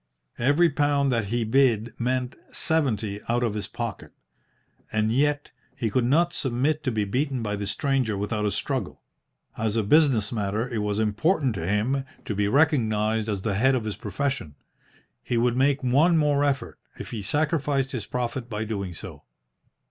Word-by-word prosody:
Every 145 +8 +4
pound 145 -1 +2
that 115 -4 +1
he 115 +3 -1
bid 115 -2 +2
meant 125 +1 -1
seventy 110 -10 0
out 120 +1 +1
of 115 -3 0
his 105 -1 -3
pocket. - - -6 0.8
And 110 0 +1
yet 145 +2 +1 0.2
he 110 -3 -2
could 125 +2 +2
not 170 +7 +3
submit 140 +4 0
to 130 - +1
be 110 -2 0
beaten 130 +3 -1
by 105 -1 -1
this 100 -1 -3
stranger 130 -5 0
without 105 +1 -2
a - - 0
struggle. - - -3 0.6
As 110 -1 0
a 110 - +2
business 125 -4 +3
matter 105 +1 -1
it 120 -3 -3
was 105 -1 -1
important 120 - +1
to 85 -5 -4
him 115 +7 +1 0.2
to - - -2
be 100 0 +1
recognised 110 -6 +2
as 100 -3 -2
the 105 - 0
head 130 +7 +3
of 125 - -1
his 105 -3 -3
profession. 135 - -3 0.7
He 120 - -2
would 120 +1 +2
make 135 +1 +2
one 150 +7 +4
more 145 -2 +2
effort, 140 -2 -1 0.2
if - - -8
he 110 - -4
sacrificed 145 - 0
his 120 -5 -4
profit 125 0 -3
by 105 -1 -3
doing 100 -5 -4
so. - - -10
120 Hz, 175 wpm, -25 LUFS, 105-140 Hz, 0.8 s, Every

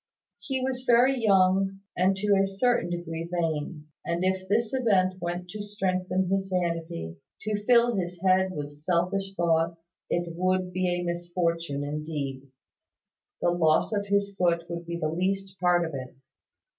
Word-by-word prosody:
He 265 -2 -3
was 255 -1 -2
very 245 +3 +5
young, 195 -1 +3
and 185 +2 +3
to 205 +1 +2
a 195 0 +3
certain 195 -1 +1
degree 170 -1 -4
vain; 160 -2 -2 0.2
and 170 +1 -1
if 190 0 0
this 220 +4 +1
event 190 -8 +2
went 175 +1 -3
to 210 +3 -6
strengthen 190 -2 -1
his 195 +1 0
vanity, 170 - -2 0.2
to 210 -1 -2
fill 240 -1 +5
his 180 -2 -3
head 190 0 +4
with 145 -3 -5
selfish 180 +5 -1
thoughts, 165 0 0
it 170 -1 -1
would 185 +1 0
be 185 0 0
a 175 0 0
misfortune 170 -4 -2
indeed. 145 -2 -4 0.9
The 175 - +3
loss 165 +3 +2
of 205 -1 -1
his 200 0 +1
foot 170 -2 +2
would 170 0 -5
be 170 0 -3
the 160 -2 -1
least 190 +3 -2
part 175 -1 +3
of 160 - -6
it. 130 -2 -6
180 Hz, 155 wpm, -27 LUFS, 170-195 Hz, 0.9 s, very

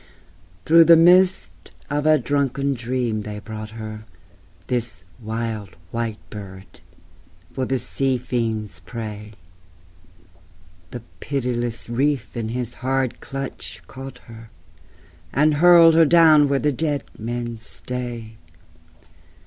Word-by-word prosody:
Through 165 +1 +7
the 165 0 +8
mist 180 +3 +5 0.4
of 145 +1 -1
a 155 0 +6
drunken 140 +1 0
dream 120 -3 -2
they 105 0 -6
brought 110 0 -7
her 110 -1 -7 0.6
(This 120 -5 -3 0.2
wild 110 -3 -5
white 115 -2 -3
bird) 95 -2 -10 0.7
for 130 - -2
the 130 +1 0
sea 135 +1 0
fiend's 110 -7 -3
prey: 105 +2 -7 1.6
The 120 -2 -8 0.2
pitiless 120 -4 -2
reef 135 +4 -1
in 115 -2 -3
his 120 0 -4
hard 130 -1 -1
clutch 135 -1 -6
caught 135 -1 -9
her, 115 0 -12 0.8
And 150 +3 +3
hurled 170 -2 +8
her 165 0 +6
down 155 -2 +6
where 140 - +2
the 150 +2 +1
dead 145 0 -1
men 120 0 -5
stay. 120 -1 -7
120 Hz, 115 wpm, -22 LUFS, 110-140 Hz, 1.6 s, the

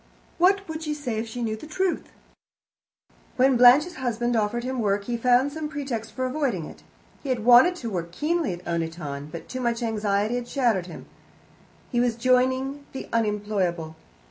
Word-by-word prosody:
What 390 +3 +3
would 320 0 -5
she 305 -2 -3
say 250 -7 -3
if 225 - -4
she 240 +2 -5
knew 220 -1 -1
the 220 - -11
truth?" 370 +3 -2 1.2
When 260 +1 +4
Blanche's 260 +8 +6
husband 240 -1 -1
offered 225 +2 0
him 260 0 -3
work, 200 -2 +1
he 240 +3 -3
found 250 +3 +3
some 310 -1 -4
pretext 250 -7 -4
for 255 +2 -2
avoiding 255 - -1
it. - - -12 0.4
He 280 - -6
had 240 -4 -1
wanted 250 +6 +6
work 175 -5 -4
keenly 310 - 0
at 175 +1 -10
Oniton, 160 -4 -4
but 165 - -8
too 255 - -5
much 235 0 -1
anxiety 210 -1 0
had 245 -1 -3
shattered 235 -10 +1
him; 170 - -10 0.9
he 240 - +1
was 240 -1 +2
joining 260 +3 +1
the 265 - -7
unemployable. 205 -7 -1
240 Hz, 170 wpm, -25 LUFS, 210-270 Hz, 1.2 s, Blanche's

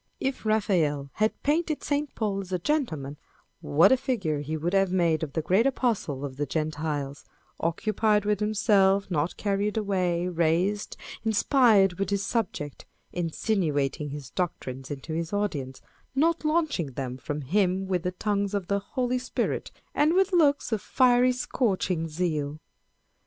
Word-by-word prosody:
If 265 -4 -2
Raphael 165 -10 +1
had 215 +1 0
painted 310 +1 0
St. 290 0 -1
Paul 200 -3 -1
as 190 -1 -10
a 180 - +1
gentleman, 165 - -2 0.4
what 165 +7 +5
a - - +7
figure 220 - -1
he 155 +2 -3
would 170 +4 -2
have 195 -1 +3
made 170 -4 +2
of 150 -4 -4
the 160 - -1
great 200 - +3
Apostle 215 - -1
of 135 -2 -7
the 145 0 -1
Gentiles 150 -3 -3 0.4
â€" - - +2
occupied 210 +4 +1
with 210 -1 +1
himself, 200 -2 +3
not 155 +1 0
carried 205 +1 -1
away, 180 -4 0
raised, 180 +4 0 0.3
inspired 215 - +4
with 195 -2 0
his 200 0 0
subject 185 - -3 0.3
â€" - - -4
insinuating 155 -5 0
his 140 -2 -7
doctrines 135 -7 -4
into 145 +2 -5
his 165 0 -3
audience, 145 -11 -2 0.3
not 330 +4 +2
launching 305 - 0
them 130 -1 -4
from 145 +4 -4
him 190 +5 +1
with 185 -2 0
the 180 - -1
tongues 200 +1 -1
of 200 -3 -1
the 200 0 +2
Holy 250 +5 -1
Spirit, 250 - -2 0.2
and 305 +4 +3
with 380 0 +3
looks 290 -7 +3
of 220 -3 0
fiery 250 +1 +4
scorching 195 -9 -1
zeal 155 -3 -2
190 Hz, 155 wpm, -27 LUFS, 155-220 Hz, 0.4 s, a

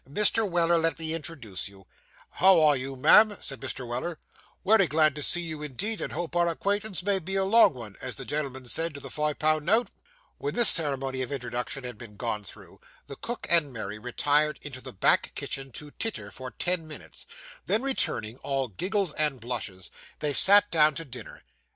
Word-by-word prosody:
'Mr. 210 +6 +3
Weller, 170 -1 +2
let 165 -2 0
me 160 -1 -2
introduce 145 - -4
you.' 95 -1 -18 0.5
'How 190 -1 +6
are 150 -2 +5
you, 135 +1 -4
ma'am?' 205 +10 +5
said 135 -2 -3
Mr. 130 -2 -4
Weller. 130 +8 -4 0.5
'Wery 195 -1 +4
glad 155 0 +3
to 150 - -7
see 175 +4 +1
you, 160 -3 -6
indeed, 185 - -4
and - - -4
hope 170 +1 -4
our 175 0 +2
acquaintance 200 +2 -2
may 200 0 +1
be 190 +2 -6
a 195 - +1
long 200 - +5
'un, 105 -4 -9
as 130 - -5
the 135 - -8
gen'l'm'n 130 -1 -4
said 165 +4 -1
to - - -7
the - - -10
fi' 150 0 -1
pun' 155 0 0
note.' 225 +7 +2 0.5
When 430 - -3
this 240 -2 +8
ceremony 135 -4 +3
of 130 - -4
introduction 125 0 -4
had 125 -3 -7
been 105 -4 -10
gone 110 -1 -3
through, 100 - -14 0.2
the 140 - -9
cook 240 - -6
and 165 -5 +4
Mary 110 -3 -6
retired 145 +6 0
into 135 -3 -8
the - - -8
back 95 - +2
kitchen 135 -1 -4
to 150 -2 -10
titter, 225 +7 -5
for 130 -1 -8
ten 175 +3 -2
minutes; 155 - -8 0.4
then 220 +4 0
returning, 125 - -2
all 135 -2 -2
giggles 185 - -2
and 150 -4 -1
blushes, 110 -6 -6 0.3
they 150 -1 -2
sat 205 +6 +8
down 155 -2 +4
to 165 - -4
dinner. 125 -4 -10
150 Hz, 195 wpm, -27 LUFS, 130-175 Hz, 0.5 s, this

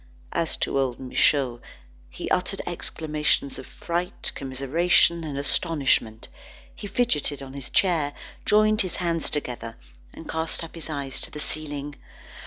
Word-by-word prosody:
As 165 - +1
to 140 - 0
old 130 -3 0
Michaud, 130 -1 +2 0.5
he - - -6
uttered - - 0
exclamations 150 -3 0
of 130 - -9
fright, 175 +1 -3
commiseration, 150 +6 +3
and 145 -3 -4
astonishment; 140 -6 +1 0.5
he 205 - -7
fidgeted 185 - +1
on 135 0 -9
his 140 -2 -6
chair, 160 -7 +2 0.3
joined 215 +1 +5
his 185 -4 -1
hands 170 -2 -1
together, 120 -6 -3 0.3
and 160 - -11
cast 160 +1 -2
up 165 - -9
his 165 -1 -7
eyes 140 -3 -4
to - - -1
the 150 - -8
ceiling. 145 -2 -2
150 Hz, 140 wpm, -25 LUFS, 135-170 Hz, 0.5 s, joined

